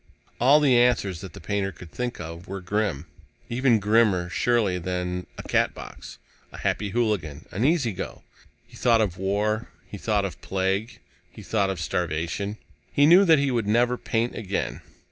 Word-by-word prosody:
All 135 +5 +6
the 135 -5 +4
answers 115 -8 +2
that 95 -4 -9
the - - -10
painter 100 +2 -2
could 85 -1 -13
think 125 +4 -4
of 85 +2 -8
were 95 +1 -5
grim. 95 -4 -1 0.5
Even 125 -1 +3
grimmer, 105 -4 +2
surely, 105 -3 +1
than 90 0 -3
a - - -7
Catbox, - - -2 0.3
a - - -10
Happy 105 0 -1
Hooligan, 95 -10 -1
an 105 - -2
Easy 145 -6 +2
Go. - - -7 0.4
He - - -18
thought 115 -2 +3
of 95 -5 0
war. 105 +3 0 0.2
He 100 +1 -9
thought 105 -2 +1
of 95 - -6
plague. 95 +4 -2 0.3
He - - -12
thought 100 -3 +1
of 95 -3 -3
starvation. 85 +4 -2 0.3
He 145 - +4
knew 180 +6 +7
that 165 -3 +6
he 140 -1 +1
would 115 -4 0
never 120 +3 +3
paint 115 0 -1
again. 95 - -3
100 Hz, 170 wpm, -25 LUFS, 90-120 Hz, 0.5 s, knew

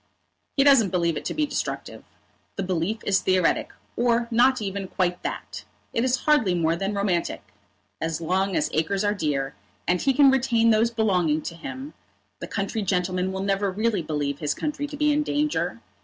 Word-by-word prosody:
"He 275 - +5
doesn't 270 -8 +6
believe 170 -3 +1
it - - -4
to - - -2
be 310 - +1
destructive. - - -4 0.5
The 195 - -2
belief 185 +4 -1
is 195 -2 +3
theoretic, 185 -2 +1 0.2
or 235 -1 +2
not 255 +3 +4
even 195 -2 -4
quite 180 -2 -1
that. - - -5 0.3
It 230 - +1
is 255 -1 +1
hardly 240 -12 +3
more 165 -1 +1
than 195 +4 -2
romantic. 195 -4 -1 0.6
As 160 -1 -2
long 185 +3 0
as 150 - 0
acres 175 +6 0
are 205 0 +2
dear, 145 -8 -1 0.3
and 180 0 +2
he 270 - +2
can 275 -1 +7
retain 235 -3 +3
those 220 +1 +3
belonging 180 -9 +1
to 165 - -6
him, 265 - -7 0.5
the - - -6
country 200 +1 -2
gentleman 185 -1 0
will 190 0 -3
never 195 0 +1
really 215 0 0
believe 145 -3 -2
his 150 -2 -1
country 295 -1 -3
to 290 0 -8
be 300 0 +3
in 295 +1 +2
danger. 295 - -1
195 Hz, 185 wpm, -25 LUFS, 175-240 Hz, 0.6 s, can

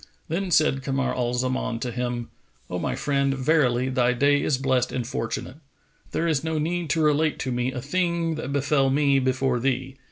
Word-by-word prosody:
Then 180 +4 -1
said 155 -5 +3
Kamar 135 0 -1
al 125 -1 -1
Zaman 130 -1 -1
to 125 - -2
him, 120 -1 -3 0.4
"O - - -2
my - - -2
friend, 140 -1 0
verily, 130 -3 +2
thy 125 -1 +2
day[FN#463] 145 +3 +3
is 140 - +2
blessed 130 -2 +1
and 125 -2 -2
fortunate! 115 +3 -4 0.5
There 170 - 0
is 155 -4 +1
no 160 -1 -1
need 170 +2 -1
to 160 +2 +1
relate 150 +1 +2
to 130 - -3
me 125 +1 -1
a 125 -1 -5
thing 170 +1 0
that 155 -3 -5
befel 140 -1 +2
me 140 0 +3
before 130 -1 +1
thee. 130 +1 -2
135 Hz, 190 wpm, -25 LUFS, 125-150 Hz, 0.5 s, said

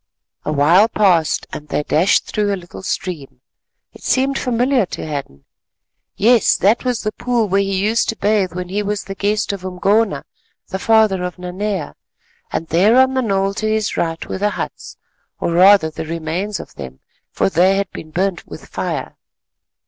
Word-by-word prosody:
A - - -1
while 165 +8 +5
passed, 180 -8 +2
and 150 - -7
they 150 - -1
dashed 165 +6 +2
through 210 -1 -1
a 200 - -1
little 175 0 -11
stream. 150 -9 -5 0.5
It - - -15
seemed 270 +1 +1
familiar 250 -2 +1
to - - -6
Hadden. 140 - -6 0.7
Yes, 225 +2 +4
that 210 +5 +2
was 250 -3 -1
the 215 - -1
pool 240 -1 -1
where 195 +1 +2
he 195 -1 -1
used 225 +2 +1
to 225 - -1
bathe 200 -4 +1
when 180 0 -5
he 200 +3 -1
was 205 0 -2
the 195 - -6
guest 205 +1 -1
of 195 -2 -7
Umgona, 190 -2 0 0.4
the 190 - -4
father 220 -3 +3
of 180 +1 -4
Nanea; 180 -1 -4 0.6
and 165 - -3
there 200 +9 +4
on 260 0 +4
the 260 - +1
knoll 195 -3 0
to 215 +2 -2
his 215 -1 -1
right 165 -1 -2
were - - -4
the 205 +1 +2
huts, - - -6 0.4
or - - -1
rather 180 -1 +5
the 160 - -6
remains 170 +5 -3
of - - -10
them, 65 -1 -9 0.3
for - - 0
they 185 +1 +3
had 195 -1 -2
been 155 - -9
burnt 185 +3 -2
with - - -10
fire. - - -4
195 Hz, 180 wpm, -18 LUFS, 170-215 Hz, 0.7 s, while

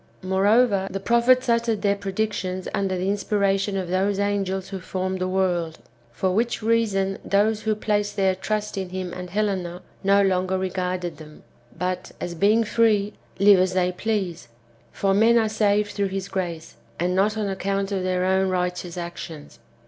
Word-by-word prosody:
Moreover, 200 +2 +3
the 195 - -4
prophets 235 +5 +3
uttered 230 -3 +1
their 200 -1 +3
predictions 195 -2 -3
under 195 -2 0
the 185 +1 -2
inspiration 200 -1 0
of 185 -2 -3
those 190 +2 0
angels 195 -2 -1
who 195 -1 -5
formed 185 +1 -3
the 185 - -1
world; 180 -4 0 0.3
for 185 +10 -1
which 230 +3 0
reason 210 -4 +1
those 210 +2 +2
who 215 0 0
place 210 -1 0
their 195 -2 +1
trust 210 +2 -3
in 190 -1 -4
him 185 -1 -5
and 180 0 -7
Helena 185 -3 -2 0.2
no 200 +1 +4
longer 185 0 +1
regarded 185 -1 -3
them, 155 -1 -13 0.3
but, 180 +1 -3
as 175 - -4
being 205 +6 +3
free, 215 -2 +2 0.2
live 200 -1 +6
as 185 0 +2
they 180 -1 +2
please; 185 -3 -3 0.4
for 195 -1 0
men 225 +4 +5
are 225 -1 +3
saved 210 -1 +1
through 200 -1 -1
his 195 0 -4
grace, 175 -4 -4 0.2
and 180 +2 0
not 210 +3 +2
on 210 -2 -1
account 195 +1 -2
of 195 -2 -1
their 185 0 0
own 190 0 +2
righteous 180 -1 -2
actions. 170 -3 -7
195 Hz, 170 wpm, -24 LUFS, 185-205 Hz, 0.4 s, live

